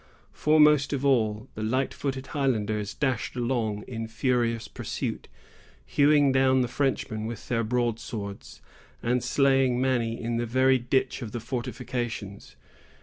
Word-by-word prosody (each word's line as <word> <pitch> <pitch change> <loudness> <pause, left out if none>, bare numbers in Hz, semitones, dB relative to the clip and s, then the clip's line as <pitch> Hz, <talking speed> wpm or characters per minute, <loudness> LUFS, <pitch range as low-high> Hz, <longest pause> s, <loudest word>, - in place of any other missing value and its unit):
Foremost 150 -2 +4
of 140 0 -2
all, 110 -5 +2
the 110 - -6
light 130 +5 0
footed 135 -2 -3
Highlanders 110 -8 -1
dashed 130 -5 -1
along 120 -4 -1
in 115 -2 -5
furious 115 0 0
pursuit, - - -4 0.6
hewing 145 -1 +4
down 130 0 +4
the 125 - +1
Frenchmen 120 -4 -1
with 115 0 -7
their 115 -1 +1
broadswords, 110 - -3 0.4
and 125 +1 +1
slaying 135 -3 +3
many 120 -3 0
in 115 0 -2
the 120 0 -1
very 130 +2 +3
ditch 130 +3 0
of 110 -4 -6
the 120 - -3
fortifications. 120 -4 -5
120 Hz, 135 wpm, -27 LUFS, 115-130 Hz, 0.6 s, Foremost